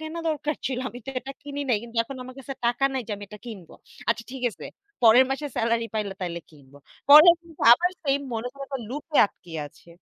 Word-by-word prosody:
কেনা 315 Hz, +2 st, -6 dB
দরকার 300 Hz, -1 st, -1 dB
ছিল। 260 Hz, -2 st, -2 dB
আমি 245 Hz, -, -10 dB
তো -, -, -3 dB
এটা 265 Hz, +2 st, -8 dB
কিনি 285 Hz, 0 st, -6 dB
নাই। 240 Hz, -, +3 dB
কিন্তু 235 Hz, 0 st, -11 dB
এখন 270 Hz, +4 st, -9 dB
আমার 255 Hz, 0 st, -10 dB
কাছে 270 Hz, 0 st, -7 dB
টাকা 240 Hz, +3 st, +1 dB
নাই 265 Hz, -1 st, -2 dB
যে 220 Hz, -, -4 dB
আমি 205 Hz, -, -9 dB
এটা 210 Hz, 0 st, -11 dB
কিনব। 195 Hz, -8 st, -9 dB, 0.4 s
আচ্ছা 230 Hz, 0 st, +1 dB
ঠিক 265 Hz, -2 st, -7 dB
আছে, -, -, -12 dB, 0.4 s
পরের 235 Hz, +3 st, +7 dB
মাসে 275 Hz, +2 st, -2 dB
সেলারি 230 Hz, 0 st, +1 dB
পাইলে 205 Hz, -3 st, -2 dB
তাইলে 170 Hz, -2 st, -4 dB
কিনব। 140 Hz, -3 st, -20 dB, 0.3 s
পরে 305 Hz, +4 st, +10 dB
কিন্তু 335 Hz, -2 st, -18 dB
আবার 345 Hz, +9 st, +4 dB
সেইম 280 Hz, -2 st, +1 dB
মনে 225 Hz, +2 st, -3 dB
করে 275 Hz, 0 st, -8 dB
আবার 270 Hz, -2 st, -4 dB
লুপে 295 Hz, +3 st, -4 dB
আটকিয়ে 165 Hz, -5 st, -9 dB
আছে। 160 Hz, -, -23 dB
250 Hz, 220 wpm, -25 LUFS, 220-285 Hz, 0.4 s, পরে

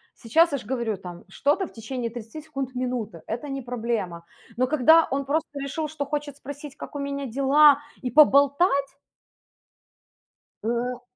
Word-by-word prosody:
Сейчас, 320 Hz, +8 st, +3 dB
я 280 Hz, -, 0 dB
ж 245 Hz, -, -10 dB
говорю, 235 Hz, -5 st, -2 dB
там 175 Hz, -2 st, -10 dB
что-то 305 Hz, -, 0 dB
в -, -, -16 dB
течение 235 Hz, +1 st, -5 dB
30 240 Hz, +6 st, -8 dB
секунд- 270 Hz, -4 st, -5 dB
минуты, 245 Hz, -8 st, -3 dB
это 240 Hz, +6 st, -4 dB
не 270 Hz, 0 st, -4 dB
проблема. 225 Hz, -8 st, -3 dB, 0.3 s
Но 255 Hz, 0 st, +2 dB
когда 315 Hz, +3 st, +5 dB
он 275 Hz, 0 st, -1 dB
просто 295 Hz, 0 st, -2 dB
решил, 300 Hz, +3 st, -3 dB
что 290 Hz, -2 st, -4 dB
хочет 290 Hz, -1 st, -4 dB
спросить, 285 Hz, 0 st, -9 dB
как -, -, -10 dB
у -, -, -3 dB
меня 280 Hz, -1 st, -3 dB
дела, 280 Hz, +3 st, +5 dB, 0.2 s
и 250 Hz, -, -2 dB
поболтать. 280 Hz, 0 st, +4 dB, 1.7 s
Ну, 240 Hz, +2 st, -2 dB
270 Hz, 155 wpm, -25 LUFS, 240-290 Hz, 1.7 s, когда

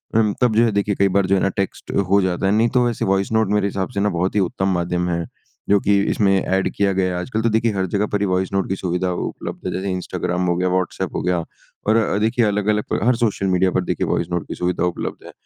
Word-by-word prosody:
अम, 105 Hz, -2 st, +3 dB
तब 120 Hz, -3 st, +3 dB
जो 115 Hz, -, +5 dB
है 115 Hz, -, +1 dB
देखिए 100 Hz, 0 st, 0 dB
कई 100 Hz, -, +3 dB
बार 100 Hz, -, +4 dB
जो 100 Hz, -, +3 dB
है 95 Hz, -, +1 dB
ना 100 Hz, -, +2 dB
टेक्स्ट 100 Hz, -1 st, -3 dB, 0.2 s
हो 100 Hz, 0 st, +4 dB
जाता 95 Hz, 0 st, -1 dB
है। 95 Hz, -, +3 dB
नहीं 115 Hz, +3 st, +3 dB
तो 125 Hz, -1 st, +3 dB
वैसे 120 Hz, -2 st, -1 dB
वॉइस 95 Hz, +2 st, 0 dB
नोट 110 Hz, -1 st, +2 dB
मेरे 105 Hz, -1 st, +2 dB
हिसाब 95 Hz, -1 st, -3 dB
से 100 Hz, -, -3 dB
ना 105 Hz, +1 st, +2 dB
बहुत 90 Hz, +2 st, -1 dB
ही 105 Hz, -, +3 dB
उत्तम 95 Hz, +1 st, 0 dB
माध्यम 90 Hz, 0 st, -1 dB
है, 85 Hz, -1 st, -1 dB, 0.4 s
जो 100 Hz, 0 st, +5 dB
कि 100 Hz, 0 st, +2 dB
इसमें 100 Hz, -2 st, +2 dB
ऐड 95 Hz, 0 st, 0 dB
किया 100 Hz, -1 st, +2 dB
गया 95 Hz, -1 st, 0 dB
है। 90 Hz, -, -2 dB
आजकल 110 Hz, +1 st, -2 dB
तो 115 Hz, -, +2 dB
देखिए 110 Hz, +1 st, +1 dB
हर 95 Hz, -1 st, 0 dB
जगह 105 Hz, +1 st, +2 dB
पर 105 Hz, -, +1 dB
ही -, -, +2 dB
वॉइस 95 Hz, +1 st, -1 dB
नोट 95 Hz, -1 st, 0 dB
की 95 Hz, -, 0 dB
सुविधा 90 Hz, -1 st, -1 dB, 0.2 s
उपलब्ध -, -, -7 dB
है, -, -, -1 dB
जैसे 95 Hz, +1 st, -2 dB
इंस्टाग्राम 90 Hz, 0 st, -2 dB
हो 85 Hz, -, +2 dB
गया, 90 Hz, +1 st, +1 dB
व्हाट्सऐप 90 Hz, -1 st, -2 dB
हो -, -, -1 dB
गया, 90 Hz, -2 st, 0 dB, 0.4 s
और 110 Hz, -, +4 dB
अ, 110 Hz, -3 st, +2 dB
देखिए 115 Hz, +2 st, +2 dB
अलग-अलग 105 Hz, +1 st, 0 dB
हर 125 Hz, +1 st, +3 dB
सोशल 100 Hz, -3 st, -1 dB
मीडिया 95 Hz, 0 st, +2 dB
पर -, -, 0 dB
देखिए -, -, -1 dB
वॉइस -, -, 0 dB
नोट 85 Hz, -2 st, -2 dB
की -, -, -5 dB
सुविधा 90 Hz, 0 st, -1 dB
उपलब्ध 90 Hz, -, -4 dB
है। -, -, -10 dB
95 Hz, 270 wpm, -21 LUFS, 90-105 Hz, 0.4 s, जो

